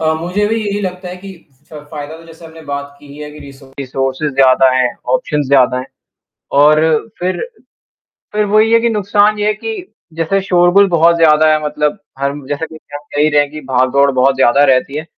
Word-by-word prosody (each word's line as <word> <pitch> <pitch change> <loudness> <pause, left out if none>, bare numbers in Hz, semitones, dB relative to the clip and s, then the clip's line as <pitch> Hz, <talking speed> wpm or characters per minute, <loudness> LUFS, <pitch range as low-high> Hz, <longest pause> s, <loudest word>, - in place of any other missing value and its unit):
अ, 160 0 +1
मुझे 190 +5 -1
भी 225 +1 -1
यही 205 0 -3
लगता 185 -1 -5
है 180 - -8
कि 195 +1 -11 0.4
फ़ 150 -1 -9
फ़ायदा 150 0 -7
तो 165 - -15
जैसे 165 0 -15
आपने 160 0 -14
बात 140 0 -6
की 145 - -16
ही 140 +1 -13
है 150 0 -8
कि 150 - -13
रिसो 140 0 -14
रिसोर्सेस 135 +2 -3
ज़्यादा 130 -1 +4
हैं, 130 -1 +2 0.3
ऑप्शंस 150 - -1
ज़्यादा 130 -2 +3
हैं 130 - -6 0.8
और 155 +1 +5 0.4
फिर 185 +1 -2 0.9
फिर 210 0 0
वही 215 +1 +3
है 230 - +5
कि 235 - +1
नुकसान 210 0 +1
ये 210 - -1
है 210 - +1
कि 445 - -6 0.4
जैसे 165 +4 -1
शोरगुल 180 +2 +3
बहुत 170 0 +3
ज़्यादा 155 -1 +4
है 155 0 0
मतलब 150 +5 -2 0.2
हम 140 0 -4
जैसे 145 +3 -3
कि 160 - -13 0.2
आप 145 - -5
कह 145 - 0
ही 150 - +4
रहे 150 -1 +3
हैं 145 - -7
कि 155 0 -8
भाग-दौड़ 130 +2 +2
बहुत 130 +1 +2
ज़्यादा 135 +2 +3
रहती 135 +1 +1
है। - - -4
155 Hz, 215 wpm, -14 LUFS, 140-185 Hz, 0.9 s, और